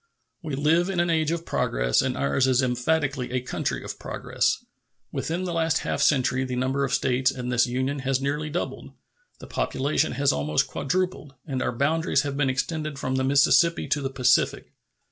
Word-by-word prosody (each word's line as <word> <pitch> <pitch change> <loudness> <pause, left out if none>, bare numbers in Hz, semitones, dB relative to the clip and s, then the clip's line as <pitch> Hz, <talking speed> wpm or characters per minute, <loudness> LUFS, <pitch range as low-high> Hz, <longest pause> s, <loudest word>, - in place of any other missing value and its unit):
We 155 -4 -4
live 160 +6 +2
in 190 -3 -1
an 175 0 +2
age 160 -2 +1
of 170 0 -2
progress, - - +1
and - - -2
ours 70 - +1
is 130 0 +3
emphatically 130 +1 0
a 130 - -1
country 125 - -3
of - - -7
progress. - - -1 0.5
Within 170 +3 -2
the 180 -2 -3
last 165 -1 +1
half - - -1
century 130 -2 +2
the 130 -1 -3
number 130 +2 0
of 135 - -1
States 130 -1 +2
in 125 -2 -4
this 120 0 +3
Union 130 +3 -1
has 135 0 0
nearly 145 +3 -2
doubled, 175 +4 -4 0.4
the - - -11
population 145 +2 -1
has 140 +2 +2
almost 75 +1 +1
quadrupled, 180 -3 -2
and 135 -4 -3
our - - 0
boundaries 140 +3 +1
have 140 -1 -3
been 140 -2 +1
extended 155 +2 -2
from 130 -1 -2
the 130 - +1
Mississippi 140 +5 +4
to 150 - +1
the 135 - -2
Pacific. 130 -1 +1
140 Hz, 185 wpm, -25 LUFS, 130-155 Hz, 0.5 s, Mississippi